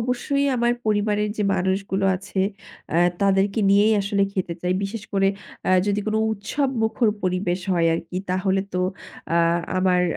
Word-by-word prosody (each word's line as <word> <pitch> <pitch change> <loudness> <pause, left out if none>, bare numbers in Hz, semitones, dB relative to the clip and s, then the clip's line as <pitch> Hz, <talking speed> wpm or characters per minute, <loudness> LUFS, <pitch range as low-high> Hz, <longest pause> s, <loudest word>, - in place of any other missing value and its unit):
অবশ্যই 255 +4 0
আমার 240 0 +2
পরিবারের 210 0 +1
যে 210 - 0
মানুষগুলো 190 +1 -1
আছে 195 +1 -4 0.5
অ্যা 165 - +2 0.2
তাদেরকে 195 +2 +2
নিয়েই 205 +2 +5
আসলে 200 0 0
খেতে 180 -3 -2
চাই। 180 0 +1
বিশেষ 210 +1 -5
করে 195 0 +3 0.4
অ্যা 185 - +2
যদি 205 0 +1
কোন 215 - -1 0.2
উৎসবমুখর 225 +1 0
পরিবেশ 185 0 -1
হয় 170 -2 +2
আরকি, 170 +2 -5
তাহলে 190 +1 +1
তো 180 - +1 0.5
আ - - +3 0.4
আমার 185 -1 +3
200 Hz, 150 wpm, -23 LUFS, 185-215 Hz, 0.5 s, নিয়েই